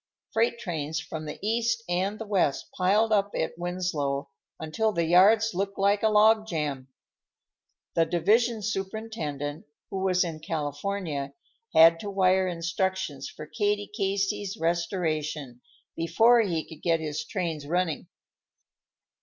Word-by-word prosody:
Freight 230 +1 +2
trains 160 -6 -3
from 160 -1 -6
the 150 - -6
east 230 0 0
and 185 +4 -1
the 225 - -6
west 190 -9 0
piled 205 +5 +2
up 200 -1 +3
at 160 - -2
Winslow 160 -6 -2 0.3
until 215 +8 0
the 170 -4 0
yards 205 +6 +5
looked 195 +2 -2
like 200 +1 +2
a 220 - +3
log 215 +1 +5
jam. 145 -7 -3 1.1
The 165 -1 +2
division 215 +7 +2
superintendent, 190 -8 -4 0.3
who 190 - -2
was 185 -1 +2
in 165 -3 -5
California, 150 -2 -3 0.4
had 165 +1 +7
to 205 - -5
wire 190 -1 +3
instructions 170 -3 -2
for 155 - -9
Katie 205 +3 -1
Casey's 195 0 -1
restoration 155 -6 -2 0.3
before 220 +9 +4
he 170 -7 -2
could 160 -2 -12
get 165 -1 +2
his 150 -2 -3
trains 165 -7 -4
running. 170 -2 -1
180 Hz, 130 wpm, -27 LUFS, 160-205 Hz, 1.1 s, had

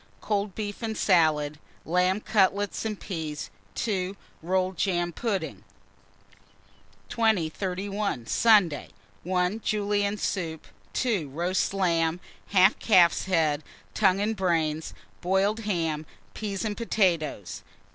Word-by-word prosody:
Cold 205 -2 -2
beef 205 0 -5
and 220 -2 -3
salad, 155 -5 +2 0.3
lamb 180 +4 +2
cutlets 205 0 +1
and 215 -2 -3
peas. 160 -5 -5 0.2
2. 195 -3 -2 0.2
Rolled 185 +2 0
jam 175 -3 0
pudding. 165 - -3 1.5
2031. 195 - -1
Sunday. 200 - +3 0.3
1. 180 +4 0
Julienne 205 -1 0
soup. 165 -5 -3 0.3
2. 210 - 0
Roast 175 +6 0
lamb, 170 -3 +1 0.3
half 195 +1 +4
calf's 180 -6 +4
head, 160 -5 +1 0.3
tongue 195 -2 +3
and 215 +2 0
brains, 160 -5 0 0.3
boiled 195 +4 +1
ham, 165 -8 -2 0.3
peas 205 -1 -4
and 210 -1 -2
potatoes. 175 - 0
185 Hz, 105 wpm, -27 LUFS, 165-205 Hz, 1.5 s, half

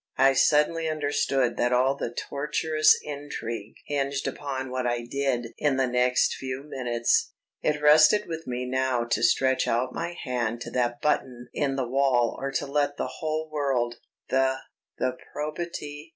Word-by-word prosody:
I 135 +1 +5
suddenly 155 +4 +3
understood 145 -4 0
that 120 +1 +1
all 130 +2 +3
the 130 - -3
tortuous 155 +4 +2
intrigue 120 -7 -6
hinged 140 -1 -1
upon 130 -2 -4
what 130 -1 -1
I 120 0 -1
did 125 -2 -1
in 145 -3 +2
the 135 - +3
next 125 0 +2
few 130 0 -5
minutes. 120 -4 0 0.3
It 150 -1 0
rested 155 +8 +6
with 165 -2 -6
me 125 0 -3
now 130 -1 0
to 120 - -1
stretch 130 0 +3
out 125 +2 0
my 170 +1 -4
hand 120 -3 -2
to - - -6
that 120 -1 -1
button 125 -5 -1
in 140 -2 0
the 130 -2 -1
wall 130 -2 +2
or 135 - -2
to 135 - -1
let 145 0 0
the - - -4
whole 155 0 -2
world 135 -5 0 0.3
"the... 130 0 +2 0.4
the 130 0 -1 0.2
probity 150 0 -5
135 Hz, 160 wpm, -26 LUFS, 125-150 Hz, 0.4 s, rested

